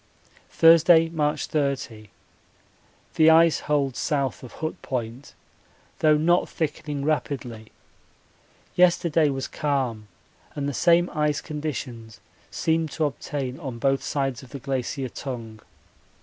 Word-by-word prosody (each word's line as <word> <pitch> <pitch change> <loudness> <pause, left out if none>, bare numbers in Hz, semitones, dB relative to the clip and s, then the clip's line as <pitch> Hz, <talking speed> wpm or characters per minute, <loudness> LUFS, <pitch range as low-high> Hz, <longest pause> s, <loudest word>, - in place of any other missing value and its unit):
Thursday, 165 0 +6
March 150 -2 -1
30. 135 -7 -3 1.0
The 160 0 +5
ice 165 0 +5
holds 140 -3 -1
south 140 -3 -1
of 125 - -11
Hut 155 0 -5
Point, 125 +1 -5 0.6
though 155 -1 +4
not 175 +4 +2
thickening 150 -2 -3
rapidly 130 -7 -3 1.0
yesterday 170 -3 +3
was 135 -1 -3
calm 130 -7 -2 0.5
and 140 -1 -2
the 145 - -2
same 170 +6 +3
ice 150 -1 0
conditions 130 -7 -6 0.3
seemed 160 -1 0
to 160 - 0
obtain 135 -1 -4
on 135 -7 -6
both 135 +2 +1
sides 135 -2 -2
of 130 - -14
the 140 - -7
Glacier 135 0 -3
Tongue. 115 -4 -7
145 Hz, 120 wpm, -24 LUFS, 130-155 Hz, 1.0 s, Thursday